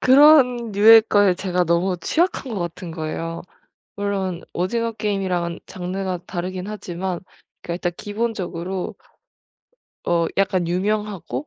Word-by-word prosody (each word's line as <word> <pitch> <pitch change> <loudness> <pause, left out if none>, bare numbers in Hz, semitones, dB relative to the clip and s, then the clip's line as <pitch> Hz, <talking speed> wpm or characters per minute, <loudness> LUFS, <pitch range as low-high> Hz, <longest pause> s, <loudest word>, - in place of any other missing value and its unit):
그런 260 -4 +6
류의 220 +3 +8
거에 205 -3 +4
제가 180 -1 0
너무 175 +2 +1
취약한 315 - 0
것 210 - -2
같은 175 +1 -5
거예요. 165 +1 -4 0.5
물론 195 -3 -2
오징어 230 +6 -1
게임이랑은 185 -5 -2
장르가 185 0 -4
다르긴 185 +1 -4
하지만 185 -3 -4 0.4
그러니까 170 - -4
일단 175 0 -2
기본적으로 195 -4 -3 1.1
어 170 -1 +2
약간 190 -3 +1
유명하고 210 - -2
190 Hz, 295 characters per minute, -22 LUFS, 175-210 Hz, 1.1 s, 류의